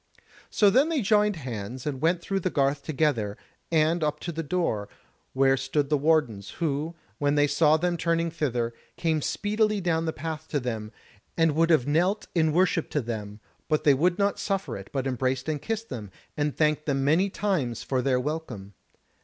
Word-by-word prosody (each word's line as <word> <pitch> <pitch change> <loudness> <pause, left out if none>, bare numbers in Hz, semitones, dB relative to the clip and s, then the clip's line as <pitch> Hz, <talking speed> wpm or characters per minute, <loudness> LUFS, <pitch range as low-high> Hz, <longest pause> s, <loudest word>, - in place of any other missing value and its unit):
So 205 -2 +4
then 275 +9 +4
they 305 -7 0
joined 210 0 +3
hands 125 -4 -6
and 140 -3 -3
went 170 +2 +2
through 195 -1 -1
the 185 - -1
garth 140 -2 +1
together, 135 -9 0 0.3
and 160 +1 +2
up 150 0 -1
to 170 - -4
the 165 0 -3
door, 140 - -1 0.4
where 135 0 +4
stood 135 +2 -1
the - - +5
wardens, 140 -10 +1
who, 160 0 -2 0.2
when 145 0 +2
they 145 0 +4
saw 150 +2 +4
them 175 +1 0
turning 165 0 0
thither, 120 -7 -1 0.2
came 160 -2 0
speedily 215 +4 0
down 165 -3 0
the 160 - 0
path 160 0 -6
to 145 - -1
them, 110 -4 -4 0.5
and 165 -1 +4
would 165 +1 +3
have 155 -7 +4
knelt 175 +8 +1
in 160 -2 +2
worship 175 0 +2
to 150 - 0
them; 105 -3 -6 0.3
but 155 -1 +1
they 145 - +6
would 175 +6 +2
not 200 -1 +1
suffer 195 - -2
it, 95 0 -9
but 135 -2 -2
embraced 130 +1 -1
and 150 -2 -2
kissed 225 +5 -3
them, 110 -5 -6 0.3
and 145 -1 -1
thanked 150 0 +1
them 135 -2 +1
many 165 +8 +3
times 185 - -1
for 130 -2 0
their 130 -1 +2
welcome. 125 -9 -5
150 Hz, 190 wpm, -26 LUFS, 130-170 Hz, 0.5 s, they